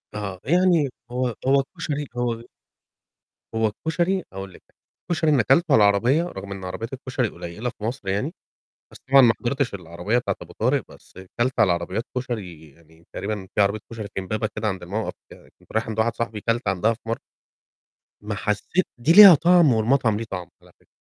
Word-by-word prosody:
آه، 100 Hz, -3 st, -5 dB
يعني 170 Hz, -2 st, +3 dB, 0.2 s
هو 125 Hz, -2 st, -1 dB
هو 135 Hz, 0 st, +4 dB
كشري 145 Hz, 0 st, -3 dB
هو 120 Hz, -1 st, -2 dB, 1.1 s
هو 110 Hz, 0 st, +2 dB
الكشري 170 Hz, -, -1 dB
هاقول 95 Hz, -1 st, -7 dB
لِك، -, -, -16 dB, 0.5 s
الكشري 160 Hz, -2 st, +2 dB
اللي 135 Hz, -5 st, +3 dB
كلته 135 Hz, +9 st, +4 dB
على -, -, +7 dB
العربية 115 Hz, +10 st, +3 dB
رغم 135 Hz, -, -7 dB
إن 95 Hz, -1 st, -6 dB
عربيات 95 Hz, +7 st, -6 dB
الكشري 130 Hz, -2 st, -2 dB
قليلة 90 Hz, +6 st, -6 dB
في 115 Hz, -, -13 dB
مصر 115 Hz, -1 st, -4 dB
يعني، 100 Hz, +11 st, -1 dB, 0.6 s
بس -, -, -13 dB
طبعًا 135 Hz, -, +8 dB
ما 115 Hz, -2 st, +5 dB
حضرتش 135 Hz, -1 st, -1 dB
العربية 90 Hz, +5 st, -2 dB
بتاعة 125 Hz, -, -2 dB
أبو -, -, -12 dB
طارق -, -, +2 dB
بس -, -, -18 dB, 0.3 s
كلت 130 Hz, +2 st, +1 dB
على 95 Hz, -5 st, +5 dB
عربيات 90 Hz, +6 st, -3 dB
كشري 95 Hz, -11 st, -5 dB
يعني 80 Hz, +2 st, -23 dB
تقريبًا 100 Hz, -1 st, -4 dB
في -, -, +1 dB
عربية 100 Hz, +2 st, +3 dB
كشري 110 Hz, -2 st, -6 dB
في -, -, -2 dB
إمبابة 110 Hz, +3 st, -2 dB
كده 110 Hz, -, -1 dB
عند 95 Hz, -3 st, -4 dB
موقَف 105 Hz, +5 st, -3 dB, 0.4 s
كنت -, -, -18 dB
رايح 110 Hz, 0 st, -1 dB
عند 110 Hz, -1 st, -5 dB
واحد 115 Hz, +1 st, +1 dB
صاحبي 115 Hz, -2 st, -3 dB
كلت 115 Hz, 0 st, -1 dB
عندها 100 Hz, +4 st, +2 dB
في 115 Hz, -, -20 dB
مر 115 Hz, -, -1 dB, 1.1 s
ما 105 Hz, 0 st, -3 dB
حسّيت 105 Hz, -, -1 dB
دي 120 Hz, +7 st, +2 dB
ليها 195 Hz, -1 st, +11 dB
طعم 170 Hz, -2 st, +5 dB
والمطعم 115 Hz, 0 st, +2 dB
ليه 115 Hz, -, -4 dB
طعم 90 Hz, -2 st, -5 dB
على -, -, -20 dB
فكرة، -, -, -30 dB
115 Hz, 185 wpm, -23 LUFS, 100-135 Hz, 1.1 s, ليها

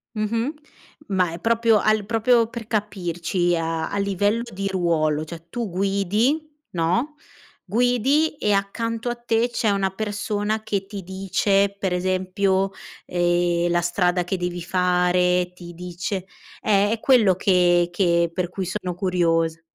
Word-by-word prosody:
Mh-mh. 225 Hz, +6 st, -1 dB, 0.5 s
Ma 185 Hz, -4 st, +1 dB
è 170 Hz, -, -7 dB
proprio 230 Hz, +1 st, +3 dB
al 215 Hz, 0 st, +2 dB
proprio 230 Hz, +1 st, +3 dB
per 235 Hz, -3 st, -7 dB
capirci 175 Hz, -4 st, -1 dB
a 165 Hz, 0 st, -2 dB
a 200 Hz, -, -3 dB
livello 200 Hz, +3 st, +1 dB
di 195 Hz, +1 st, -3 dB
ruolo, 165 Hz, -5 st, +1 dB
cioè, 165 Hz, +1 st, -10 dB
tu 235 Hz, -3 st, -3 dB
guidi, 200 Hz, -, 0 dB, 0.2 s
no, 185 Hz, -, 0 dB, 0.5 s
guidi 250 Hz, -, +2 dB
e 210 Hz, -, 0 dB
accanto 225 Hz, +4 st, -1 dB
a 240 Hz, -, -2 dB
te 235 Hz, 0 st, 0 dB
c'è 230 Hz, -2 st, 0 dB
una 195 Hz, -1 st, +1 dB
persona 210 Hz, +1 st, -2 dB
che 200 Hz, -3 st, -2 dB
ti 200 Hz, 0 st, -7 dB
dice 195 Hz, +2 st, +1 dB
per 190 Hz, -2 st, -1 dB
esempio, 190 Hz, +1 st, 0 dB, 0.3 s
ehm, 175 Hz, 0 st, +1 dB
la 175 Hz, 0 st, +2 dB
strada 180 Hz, +1 st, +1 dB
che 185 Hz, -, -2 dB
devi 175 Hz, 0 st, -3 dB
fare, 180 Hz, 0 st, +2 dB
ti 175 Hz, -1 st, -11 dB
dice 180 Hz, +2 st, -5 dB, 0.4 s
eh, 205 Hz, -1 st, +3 dB
è 225 Hz, -, -1 dB
quello 225 Hz, -9 st, +4 dB
che 175 Hz, -2 st, +3 dB
che 170 Hz, -2 st, +2 dB
per 180 Hz, -1 st, -2 dB
cui 190 Hz, 0 st, -4 dB
sono 180 Hz, 0 st, -3 dB
curiosa. 170 Hz, -3 st, +1 dB
190 Hz, 145 wpm, -23 LUFS, 175-215 Hz, 0.5 s, quello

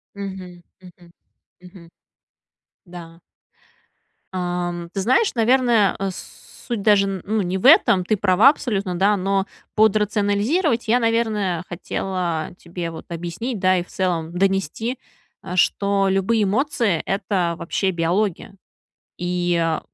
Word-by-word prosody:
Мгм, 190 Hz, -3 st, -8 dB, 0.2 s
мгм, 175 Hz, -1 st, -17 dB, 0.5 s
мгм. 180 Hz, -2 st, -15 dB, 1.0 s
Да. 170 Hz, -2 st, -12 dB, 1.1 s
Ам 175 Hz, -1 st, -3 dB
ты 195 Hz, -, -3 dB
знаешь, 260 Hz, -, +2 dB
наверное, 235 Hz, -3 st, +3 dB
э, 195 Hz, 0 st, -1 dB
с 185 Hz, -, -11 dB, 0.2 s
суть 235 Hz, -5 st, -2 dB
даже, 205 Hz, -1 st, +4 dB
н 195 Hz, -2 st, -4 dB
ну, 215 Hz, +1 st, 0 dB
не 185 Hz, +1 st, -2 dB
в 190 Hz, -, -5 dB
этом, 185 Hz, -2 st, +6 dB
ты 215 Hz, -, +1 dB
права 205 Hz, +5 st, +5 dB
абсолютно, 200 Hz, -10 st, -2 dB
да, 200 Hz, +3 st, +3 dB
но 195 Hz, +1 st, 0 dB, 0.3 s
под 220 Hz, -1 st, +4 dB
"рационализировать" 215 Hz, -, 0 dB
я, 245 Hz, +3 st, +3 dB
наверное, 220 Hz, -7 st, 0 dB
хотела 175 Hz, -2 st, -3 dB
тебе, 170 Hz, -1 st, -6 dB
вот, 165 Hz, -, -9 dB
объяснить, 175 Hz, +8 st, -4 dB
да, 185 Hz, 0 st, +3 dB
и 175 Hz, -, -1 dB
в -, -, -21 dB
целом 175 Hz, -3 st, -2 dB
донести, 195 Hz, -, -1 dB, 0.6 s
что 200 Hz, +2 st, +2 dB
любые 195 Hz, +3 st, +1 dB
эмоции- 220 Hz, -, 0 dB
это 190 Hz, -3 st, -1 dB
вообще 190 Hz, +3 st, -1 dB
биология, 180 Hz, +3 st, -1 dB, 0.6 s
и, 175 Hz, -2 st, 0 dB
195 Hz, 125 wpm, -21 LUFS, 175-210 Hz, 1.1 s, этом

